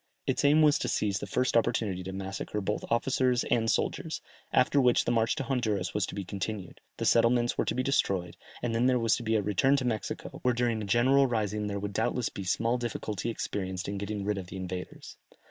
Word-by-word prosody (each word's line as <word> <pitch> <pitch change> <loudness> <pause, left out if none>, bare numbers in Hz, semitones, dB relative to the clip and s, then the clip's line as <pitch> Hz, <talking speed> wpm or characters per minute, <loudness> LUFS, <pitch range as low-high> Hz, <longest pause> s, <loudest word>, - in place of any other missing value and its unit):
Its - - 0
aim 150 +2 +5
was 150 -1 +5
to - - -2
seize 100 -2 0
the - - -6
first 130 0 0
opportunity 105 -5 +1
to 95 +1 -6
massacre 95 +2 -4
both 105 +1 -2
officers 125 +1 +2
and 115 -1 +2
soldiers, - - -1 0.3
after 135 +2 +4
which 125 -2 +3
the - - +1
march 115 -1 +2
to - - -2
Honduras 120 -8 -1
was 105 -3 0
to - - -7
be 100 - -3
continued, 100 0 -5 0.2
the - - -2
settlements 120 +1 +3
were - - 0
to - - -1
be 130 - 0
destroyed, 95 -10 0 0.3
and 120 -2 -1
then 120 +2 +2
there 130 -1 +3
was 115 -2 +2
to - - -6
be 110 -1 0
a 105 - +2
return 105 +8 +3
to 135 -2 -1
Mexico, 110 -3 -3
where 125 -1 +2
during 120 -2 0
a - - -4
general 130 +6 +4
rising 105 -3 -1
there 100 -1 -3
would 100 0 -4
doubtless 125 +3 0
be 100 - -7
small 115 +6 0
difficulty 115 -2 -3
experienced 95 -4 -3
in 100 0 -3
getting 100 0 -4
rid 105 -1 0
of 90 - -8
the 95 - -8
invaders. 90 -1 -7
110 Hz, 225 wpm, -29 LUFS, 100-125 Hz, 0.3 s, aim